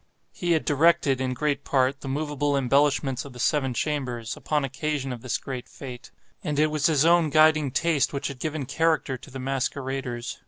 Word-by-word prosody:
He 175 -1 0
had 160 - 0
directed, 145 -3 +3
in 130 -1 -1
great 145 0 -1
part, 135 0 +1
the - - -7
moveable 145 0 -1
embellishments 135 0 +2
of 140 - -11
the 125 - -11
seven 135 -1 +1
chambers, 125 -6 -2
upon 150 -2 -1
occasion 135 0 -3
of 120 - -8
this 125 -3 -1
great 130 -3 -6
fête; 125 -3 -9 0.3
and 150 -5 -2
it 155 +1 +3
was 150 -1 +2
his 155 -2 +3
own 170 -1 +4
guiding 155 -1 +4
taste 145 +1 +1
which 140 0 -3
had 140 -3 -7
given 155 -2 -3
character 155 0 +1
to 130 - -12
the 135 - -8
masqueraders. 130 -2 -3
140 Hz, 190 wpm, -25 LUFS, 130-150 Hz, 0.3 s, own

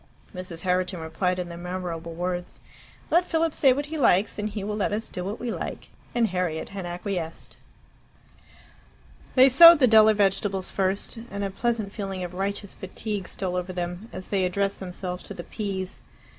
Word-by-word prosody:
Mrs. 180 -3 -7
Herriton 180 -1 0
replied 170 +3 -1
in 180 -1 -3
the 170 - -7
memorable 175 -2 -5
words, 180 +1 -3 0.5
"Let 345 +3 +5
Philip 330 -2 0
say 270 - +5
what 285 +3 0
he 310 +1 -5
likes, 210 -5 +3
and 210 +1 -1
he 205 -1 -5
will 210 +1 -2
let 210 - 0
us 220 +2 -3
do 180 - -5
what 200 +4 -4
we 240 -1 -3
like." - - -5 0.3
And 235 -2 +3
Harriet 180 -3 -2
had 195 -3 -6
acquiesced. 175 -2 -5 1.8
They 260 0 +8
sowed 335 +6 +10
the 275 - +5
duller 220 -2 +7
vegetables 195 -1 +1
first, 195 +4 -1
and 200 0 -4
a 195 - -2
pleasant 220 -1 -1
feeling 195 -3 -4
of 180 0 -6
righteous 200 +1 -3
fatigue 195 0 -5
stole 185 -2 -3
over 180 +1 -3
them 180 +4 -4
as 185 - -8
they 195 -2 +1
addressed 195 +2 0
themselves 180 -1 -5
to - - -9
the 175 - -6
peas. 195 -3 -4
195 Hz, 180 wpm, -26 LUFS, 180-215 Hz, 1.8 s, sowed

